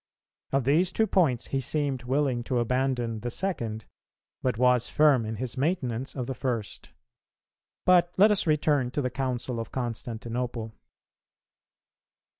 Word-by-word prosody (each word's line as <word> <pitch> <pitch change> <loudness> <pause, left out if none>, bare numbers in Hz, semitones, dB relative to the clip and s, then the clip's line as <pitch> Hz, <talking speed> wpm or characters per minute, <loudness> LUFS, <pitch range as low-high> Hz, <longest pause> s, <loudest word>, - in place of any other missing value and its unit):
Of 135 -1 +2
these 155 +8 +3
two 220 - +2
points, 160 - +1
he 135 - 0
seemed 135 -2 -1
willing 130 -2 0
to 130 - -1
abandon 120 -1 0
the 120 +3 -4
second, 115 - -3 0.6
but 125 -3 0
was 125 -1 +3
firm 140 -7 +4
in 110 - -3
his 125 +3 -5
maintenance 135 -5 -1
of 130 -3 -3
the 130 - -3
first. 120 -5 -4 1.0
But 175 -1 +5
let 210 +3 +7
us 195 -3 +1
return 150 -4 +2
to - - +3
the 125 - -1
Council 125 -2 -2
of 115 - -6
Constantinople. 120 -1 -4
130 Hz, 140 wpm, -27 LUFS, 120-145 Hz, 1.0 s, let